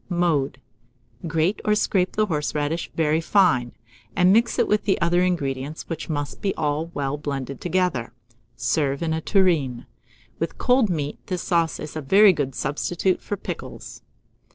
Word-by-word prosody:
Mode. 160 Hz, -7 st, 0 dB, 0.7 s
Grate 165 Hz, +5 st, 0 dB
or 210 Hz, -, +2 dB
scrape 190 Hz, -3 st, +1 dB
the 215 Hz, -, +3 dB
horseradish 150 Hz, -1 st, -2 dB
very 160 Hz, 0 st, +2 dB
fine, 160 Hz, -10 st, +3 dB, 0.4 s
and 180 Hz, +1 st, +5 dB
mix 235 Hz, +2 st, +3 dB
it -, -, +2 dB
with 210 Hz, 0 st, +1 dB
the 195 Hz, -, +2 dB
other 175 Hz, +1 st, +2 dB
ingredients, 145 Hz, -5 st, -2 dB
which 165 Hz, -1 st, -5 dB
must 145 Hz, -4 st, -3 dB
be 195 Hz, -, -1 dB
all 155 Hz, +1 st, -1 dB
well 140 Hz, +1 st, -2 dB
blended 140 Hz, -3 st, -4 dB
together; 180 Hz, -9 st, 0 dB, 0.4 s
serve 140 Hz, +5 st, 0 dB
in 160 Hz, -1 st, 0 dB
a 160 Hz, -, -2 dB
tureen. 160 Hz, -, +1 dB, 0.5 s
With 165 Hz, 0 st, -3 dB
cold 250 Hz, -3 st, +3 dB
meat, 150 Hz, -4 st, -2 dB
this 180 Hz, -2 st, -3 dB
sauce 170 Hz, -2 st, +1 dB
is 150 Hz, 0 st, -7 dB
a 155 Hz, -, -3 dB
very 195 Hz, +7 st, +6 dB
good 135 Hz, -5 st, -3 dB
substitute 175 Hz, +6 st, -1 dB
for 205 Hz, -, -4 dB
pickles. -, -, -7 dB
160 Hz, 155 wpm, -23 LUFS, 145-185 Hz, 0.7 s, very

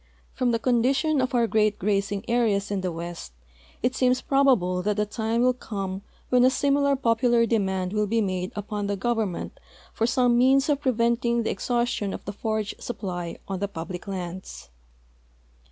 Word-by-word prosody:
From 250 Hz, -, 0 dB
the 230 Hz, -, +2 dB
condition 265 Hz, +5 st, +2 dB
of 255 Hz, 0 st, -1 dB
our 235 Hz, -1 st, +4 dB
great 215 Hz, -2 st, +2 dB
grazing 200 Hz, +1 st, -1 dB
areas 215 Hz, -4 st, +1 dB
in 200 Hz, -2 st, -1 dB
the 185 Hz, -1 st, -2 dB
west 170 Hz, -, -7 dB, 0.5 s
it 250 Hz, +1 st, +1 dB
seems 255 Hz, -1 st, +2 dB
])robable 240 Hz, -11 st, +2 dB
that 210 Hz, +1 st, 0 dB
the 210 Hz, -, +2 dB
time 225 Hz, +2 st, -1 dB
will 255 Hz, 0 st, +4 dB
come 195 Hz, -5 st, -5 dB, 0.3 s
wben 250 Hz, -1 st, +5 dB
a 255 Hz, -, +7 dB
similar 280 Hz, +1 st, +2 dB
poimlar 235 Hz, -1 st, +2 dB
demand 190 Hz, -4 st, 0 dB
will 210 Hz, 0 st, +1 dB
be 225 Hz, +3 st, +1 dB
made 185 Hz, -3 st, -1 dB
uijon 205 Hz, 0 st, -3 dB
the 200 Hz, 0 st, -1 dB
government 220 Hz, -3 st, -2 dB, 0.3 s
for 225 Hz, -, 0 dB
some 245 Hz, -1 st, +3 dB
means 270 Hz, +3 st, +4 dB
of 290 Hz, -1 st, +1 dB
preventing 235 Hz, -2 st, +1 dB
the -, -, -1 dB
ex -, -, -5 dB
haustion 240 Hz, -5 st, 0 dB
of -, -, -10 dB
the 205 Hz, -, -5 dB
forage 215 Hz, 0 st, -2 dB
supply 180 Hz, -7 st, -5 dB
on 195 Hz, -1 st, -3 dB
the 200 Hz, -, -1 dB
])ublic 175 Hz, +1 st, -7 dB
lands. 185 Hz, -, -6 dB
220 Hz, 175 wpm, -25 LUFS, 195-245 Hz, 0.5 s, a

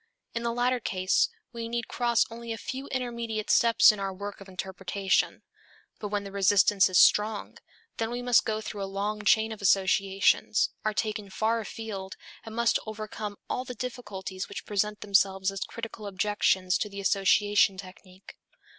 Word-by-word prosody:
In 230 Hz, -, -2 dB
the 235 Hz, 0 st, -1 dB
latter 245 Hz, +1 st, +1 dB
case 185 Hz, -3 st, +1 dB, 0.2 s
we 230 Hz, -1 st, -5 dB
need 235 Hz, 0 st, -3 dB
cross 235 Hz, -1 st, +2 dB
only 230 Hz, 0 st, -7 dB
a 225 Hz, -, -3 dB
few 270 Hz, +3 st, -6 dB
intermediate 235 Hz, -4 st, -3 dB
steps 230 Hz, -2 st, +6 dB
in 210 Hz, -, -7 dB
our 195 Hz, -1 st, -2 dB
work 200 Hz, +1 st, -7 dB
of 195 Hz, -, -11 dB
interpretation. 190 Hz, +1 st, -1 dB, 0.6 s
But 210 Hz, -, -4 dB
when 205 Hz, 0 st, -2 dB
the 200 Hz, -, -8 dB
resistance 195 Hz, 0 st, +4 dB
is 185 Hz, -, +2 dB
strong, 210 Hz, 0 st, +3 dB, 0.4 s
then 225 Hz, 0 st, -1 dB
we 245 Hz, +1 st, -4 dB
must 245 Hz, -1 st, +4 dB
go 215 Hz, 0 st, -2 dB
through 210 Hz, -1 st, -6 dB
a 195 Hz, -, -3 dB
long 205 Hz, +2 st, -3 dB
chain 220 Hz, +1 st, +3 dB
of 220 Hz, -, -7 dB
associations, 195 Hz, +1 st, +2 dB
are 215 Hz, -1 st, -1 dB
taken 210 Hz, -2 st, -2 dB
far 220 Hz, +4 st, 0 dB
afield 210 Hz, -4 st, -6 dB, 0.3 s
and 225 Hz, -1 st, -9 dB
must 235 Hz, 0 st, +2 dB
overcome 215 Hz, -1 st, -6 dB
all 250 Hz, -, -2 dB
the 250 Hz, -1 st, -8 dB
difficulties 205 Hz, -6 st, -6 dB
which -, -, -7 dB
present 210 Hz, 0 st, -1 dB
themselves 195 Hz, -1 st, +2 dB
as 195 Hz, -, -7 dB
critical 225 Hz, -2 st, -7 dB
objections 190 Hz, -1 st, +1 dB
to 210 Hz, -, -2 dB
the 200 Hz, 0 st, -8 dB
association 200 Hz, 0 st, +3 dB
technique. 185 Hz, 0 st, -12 dB
210 Hz, 170 wpm, -28 LUFS, 195-230 Hz, 0.6 s, steps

